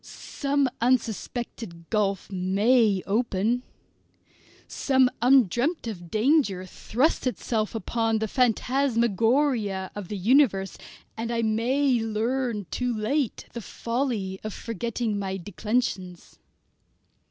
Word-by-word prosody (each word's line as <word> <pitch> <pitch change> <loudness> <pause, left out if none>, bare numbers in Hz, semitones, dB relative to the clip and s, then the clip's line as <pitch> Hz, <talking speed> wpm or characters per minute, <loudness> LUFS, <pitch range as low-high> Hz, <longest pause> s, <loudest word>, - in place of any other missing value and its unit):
Some 280 -1 -1
unsuspected 230 -6 -2
gulf 200 -3 0
may 200 +2 +2
open, 225 +2 0 1.1
some 260 -2 +2
undreamt 255 - +3
of 175 -7 -6
danger 215 - +2
thrust 255 - 0
itself 225 -3 -1
through 225 +2 0
the 220 0 -1
phantasmagoria 235 -3 +1
of 205 -3 -6
the 205 - -4
universe, 195 -2 +3 0.4
and 225 +1 -4
I 230 -1 0
may 245 +4 +2
learn 225 0 -1
too 250 -1 -1
late 235 +4 -1
the 235 - -5
folly 230 -5 -3
of 215 -2 -5
forgetting 230 -1 -3
my 190 -1 -3
declensions. 195 -1 -3
225 Hz, 100 wpm, -26 LUFS, 200-250 Hz, 1.1 s, undreamt